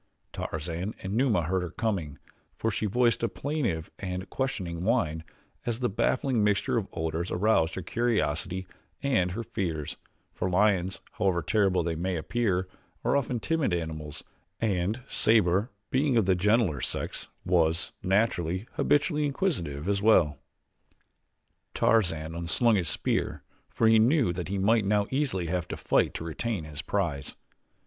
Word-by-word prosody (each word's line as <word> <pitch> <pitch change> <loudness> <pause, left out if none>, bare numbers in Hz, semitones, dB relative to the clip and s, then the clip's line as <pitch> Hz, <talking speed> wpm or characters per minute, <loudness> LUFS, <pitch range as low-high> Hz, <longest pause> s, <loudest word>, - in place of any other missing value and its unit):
Tarzan 85 +6 -4
and 95 +1 -3
Numa 115 -7 +2
heard 90 +3 0
her 90 - -4
coming, 95 -8 -2 0.4
for 115 - -1
she 105 - -1
voiced 120 +3 +2
a 115 - +1
plaintive 125 - -2
and 95 -1 -4
questioning 90 -11 -2
whine 90 -8 +1 0.4
as 120 -1 -2
the 125 - +1
baffling 120 +3 +1
mixture 105 -1 +1
of 110 -4 0
odors 80 +2 -2
aroused 90 -4 +2
her 95 - -4
curiosity 95 -5 -1 0.4
and 95 -11 +2
her 115 - -3
fears, 85 -9 -3 0.4
for 95 - -2
lions, 95 -1 +2 0.2
however 90 -4 +2
terrible 95 -5 +2
they 85 0 -1
may 90 +3 -2
appear, 95 +2 0 0.4
are - - +3
often 125 -3 0
timid 150 - 0
animals 80 -3 -5 0.4
and 105 +3 0
Sabor, 105 0 +3 0.2
being 135 -1 +2
of 110 - +4
the 95 - +4
gentler 95 - +2
sex, - - -2 0.2
was, 85 -2 +2
naturally, 95 -2 +1
habitually 150 +1 +2
inquisitive 95 - -1
as 100 -1 +1
well. 85 -10 +4 1.4
Tarzan 80 -8 +2
un 85 0 -5
slung 115 +6 +4
his 90 -6 +1
spear - - -1 0.3
for 115 - +2
he 110 0 +6
knew 120 - +3
that 90 0 -4
he 100 +1 -2
might 110 +3 +3
now 100 +1 +2
easily 130 -10 0
have 90 +1 -2
to - - -5
fight - - +1
to - - -4
retain 90 +3 -3
his 75 -2 -6
prize. 70 -1 -2
95 Hz, 150 wpm, -28 LUFS, 85-115 Hz, 1.4 s, he